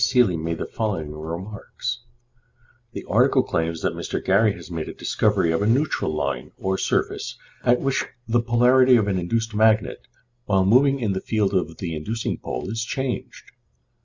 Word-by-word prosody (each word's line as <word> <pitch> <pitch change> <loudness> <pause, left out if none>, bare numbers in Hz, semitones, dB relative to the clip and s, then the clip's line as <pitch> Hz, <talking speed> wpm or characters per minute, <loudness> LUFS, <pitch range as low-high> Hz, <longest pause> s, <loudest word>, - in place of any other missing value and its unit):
Seeley 125 -8 +4
made 80 +1 -3
the - - -3
following 95 -9 -3
remarks: 95 +10 -5 0.9
The - - -6
article - - +4
claims 80 0 -2
that - - +1
Mr. - - -3
Gary 100 +2 +4
has 85 -1 -11
made 80 -2 -4
a - - -8
discovery 80 - +1
of 80 - 0
a 105 - +1
neutral 130 - +1
line 70 -4 -3
or 95 0 -1
surface, - - -1 0.3
at 120 0 +3
which 135 -1 0 0.2
the 120 +1 +2
polarity 125 +2 +5
of 110 -4 +2
an 95 -2 0
induced 110 +5 -1
magnet, 110 -2 +2 0.4
while 95 -2 +2
moving 135 +6 +4
in 110 -5 0
the 95 - -3
field 105 -3 0
of 85 -4 -1
the 85 -3 -4
inducing 110 +9 -3
pole, - - -5
is 115 0 -2
changed. 130 +2 -4
105 Hz, 170 wpm, -23 LUFS, 85-120 Hz, 0.9 s, polarity